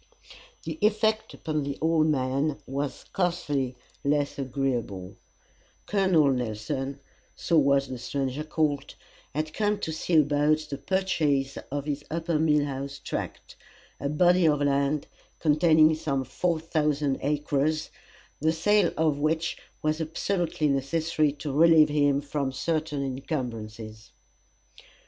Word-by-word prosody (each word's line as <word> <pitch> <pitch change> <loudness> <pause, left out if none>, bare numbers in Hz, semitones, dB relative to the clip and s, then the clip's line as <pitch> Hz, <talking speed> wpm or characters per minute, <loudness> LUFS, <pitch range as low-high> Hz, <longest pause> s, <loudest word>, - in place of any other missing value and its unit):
The 315 - -5
effect 215 +1 +1
upon 155 -2 -2
the 140 0 -4
old 160 -1 +3
man 140 +1 0
was 140 +1 -2
scarcely 150 -8 -1 0.3
less 145 0 0
agreeable. 125 -8 -2 0.7
Col. 195 -2 +1 0.2
Nelson, 130 +3 -3 0.4
so 165 -2 +2
was 140 -1 +3
the 130 -1 -6
stranger 135 +2 -2
called 150 -3 -1 0.4
had 155 +1 -2
come 210 +1 +1
to 160 - -2
see 160 +2 -1
about 150 0 +4
the 140 - -4
purchase 150 -6 0
of 145 0 -3
his 145 -1 -3
upper 165 -1 -1
mill 150 -2 +3
house 140 0 -5
tract - - -6 0.4
a 140 - -2
body 175 +3 +4
of 150 -2 +3
land 140 +1 +1 0.3
containing 155 0 +5
some 155 -4 -1
four 165 +6 -1
thousand 150 -3 0
acres, 150 +1 0 0.5
the 160 +2 +2
sale 180 +4 +3
of 155 -3 +2
which 160 +2 0 0.3
was 155 +1 0
absolutely 170 0 -1
necessary 150 +2 +1
to 145 0 -5
relieve 160 0 +6
him 145 -1 +2
from 140 -1 -2
certain 150 +1 -2
incumbrances. 115 -6 -5
150 Hz, 125 wpm, -27 LUFS, 140-160 Hz, 0.7 s, relieve